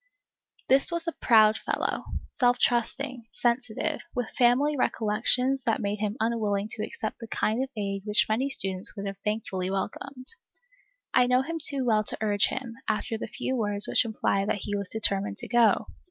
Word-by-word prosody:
This 270 +4 +5
was 340 -1 -2
a - - +1
proud 220 -6 +4
fellow, - - -2 0.3
self 245 -1 +3
trusting, 245 +1 -1
sensitive, 240 -2 -1
with 245 -3 -2
family 260 +4 +3
recollections 250 +3 +1
that 225 - +1
made 205 +1 -2
him 210 +2 -2
unwilling 215 -3 0
to 220 - -4
accept 215 0 -5
the 230 - -8
kind 220 +2 0
of 265 - -5
aid 195 -1 -2
which 210 0 +3
many 245 +6 0
students 195 -7 -1
would 200 -1 -5
have 195 0 -5
thankfully 205 -4 -2
welcomed. 255 +7 -4 0.9
I 250 -1 +4
knew 250 +1 +3
him 330 +3 -4
too 280 -4 +2
well 215 -3 +3
to - - -1
urge 205 -1 +2
him, 250 -3 -5
after 220 +2 -1
the 220 - -5
few 260 - -3
words 205 -3 +2
which - - +3
implied 210 -3 -1
that 205 - -1
he 205 - -2
was 200 -2 -2
determined 200 -2 0
to - - -5
go. 235 -1 +3
225 Hz, 180 wpm, -27 LUFS, 210-250 Hz, 0.9 s, This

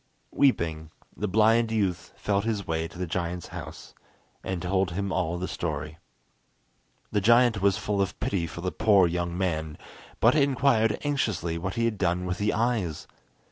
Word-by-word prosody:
Weeping, 80 - +1 0.3
the 105 - -2
blind 110 +3 +3
youth 95 -6 -1
felt 100 -1 0
his 105 -3 -2
way 80 0 -1
to 85 - -14
the 90 - -2
giant's 85 0 -3
house, - - -9 0.5
and 95 -1 -3
told 95 +1 0
him 100 +3 -3
all 85 -1 -1
the 90 +1 -3
story. 75 -1 -4 1.1
The 105 - +1
giant 115 0 +4
was 100 -1 +3
full 100 -1 -1
of 95 -2 -2
pity 90 -4 -1
for 85 - -8
the 90 0 -2
poor 105 -4 +4
young 85 0 -2
man, 80 -5 -2 0.4
but 115 +2 +5
inquired 135 -6 +3
anxiously 105 - -1
what 95 +5 -4
he 115 -1 +1
had 110 -3 -1
done 90 -1 0
with 90 0 -3
the 105 +1 +1
eyes. 110 -8 -1
95 Hz, 170 wpm, -27 LUFS, 85-110 Hz, 1.1 s, but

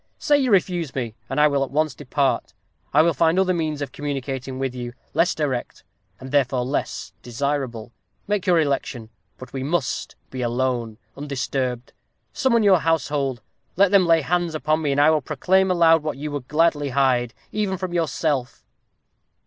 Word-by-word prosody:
Say 290 -1 +3
you 260 -2 +1
refuse 175 - +1
me, 120 -4 -3 0.2
and 135 +3 -1
I 150 - +6
will 140 -2 +1
at 135 - -4
once 155 0 0
depart. 135 +1 -1 0.4
I 150 +2 +5
will 170 0 +3
find 165 +1 +2
other 190 -1 +3
means 155 -4 -2
of 135 - -6
communicating 135 -2 -4
with 135 -1 -2
you 120 -1 -6 0.2
less 165 +3 +2
direct, 135 -6 -3 0.4
and 130 0 -9
therefore 130 -3 +1
less 135 +3 -3
desirable. 125 -2 -3 0.4
Make 205 -2 -1
your 175 -2 +5
election. 135 -6 -2 0.3
But 130 0 -11
we 135 - -3
must 145 0 -2 0.2
be 130 - -5
alone 120 -2 -1 0.2
undisturbed. 130 -3 -3 0.4
Summon 235 -4 +2
your 195 -4 +5
household 140 -6 -1 0.3
let 195 +1 +4
them 195 -3 +5
lay 165 -1 +5
hands 175 +1 -1
upon 155 +1 0
me, 145 -2 0
and 140 - +1
I 150 +2 +6
will 155 -1 +2
proclaim 185 +7 +1
aloud 165 -3 +5
what 155 -2 -4
you 150 +1 -5
would 140 -3 -5
gladly 150 -2 +2
hide, 125 -3 +1 0.2
even 205 -3 -1
from 185 -1 -4
yourself." 150 -5 -1
145 Hz, 175 wpm, -23 LUFS, 130-165 Hz, 0.4 s, I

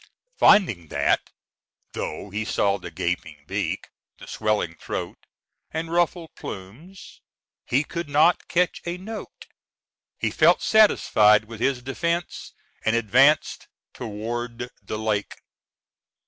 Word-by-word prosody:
Finding 115 - +5
that, - - +1 0.6
though 95 +6 -5
he 105 +2 -2
saw 100 -2 +1
the 90 - -8
gaping 85 -3 -4
beak, - - -3 0.3
the - - -12
swelling 105 -6 -1
throat, - - -6 0.4
and 165 +1 -4
ruffled 175 -1 0
plumes, 125 - -10 0.5
he 135 +4 +2
could 170 0 -5
not 155 +5 +3
catch 180 0 +1
a 170 +1 -2
note, 210 +4 -9 0.7
he - - -1
felt - - +4
satisfied 110 - +5
with 115 -1 -10
his 125 0 0
defence, 170 +6 -3 0.3
and 110 - +2
advanced 130 +7 +3 0.3
toward 120 +2 -5
the 110 - -5
lake. 105 -2 -2
120 Hz, 115 wpm, -24 LUFS, 105-170 Hz, 0.7 s, Finding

